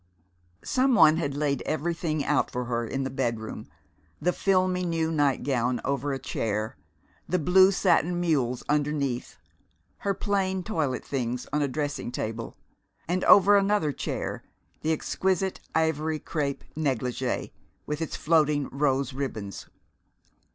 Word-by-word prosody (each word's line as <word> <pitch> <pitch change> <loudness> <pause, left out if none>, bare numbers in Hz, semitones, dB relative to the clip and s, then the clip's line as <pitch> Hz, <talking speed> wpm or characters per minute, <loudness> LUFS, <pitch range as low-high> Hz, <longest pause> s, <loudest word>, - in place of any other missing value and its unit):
Some 260 0 +2
one 160 -4 +7
had 145 -4 -2
laid 145 -3 0
everything 155 -1 -1
out 150 - +2
for 125 0 -3
her 120 -1 -2
in 135 +4 -2
the 130 - -3
bedroom; 115 -4 -3 0.5
the 180 +3 +1
filmy 185 -1 +2
new 165 -2 0
nightgown 130 -5 +1
over 140 +1 -1
a 135 - -1
chair, 110 -4 -2 0.5
the 180 - +2
blue 185 +4 +5
satin 175 -2 +2
mules 135 -8 0
underneath, 145 -4 -1 0.6
her 200 -1 -1
plain 190 -2 0
toilet 155 -10 -2
things 125 -2 -2
on 150 - +2
a 145 - +2
dressing 145 -2 -3
table, 115 -1 -4 0.5
and 180 +2 0
over 205 +1 +7
another 200 -6 +2
chair - - -4 0.4
the 160 - 0
exquisite 190 +4 0 0.2
ivory 160 -1 +1
crepe 145 -3 -3
negligee 130 -4 -2 0.3
with 150 +1 -3
its 160 - -3
floating 150 -3 +2
rose 140 0 0
ribbons. 110 -7 -5
150 Hz, 130 wpm, -27 LUFS, 130-175 Hz, 0.6 s, one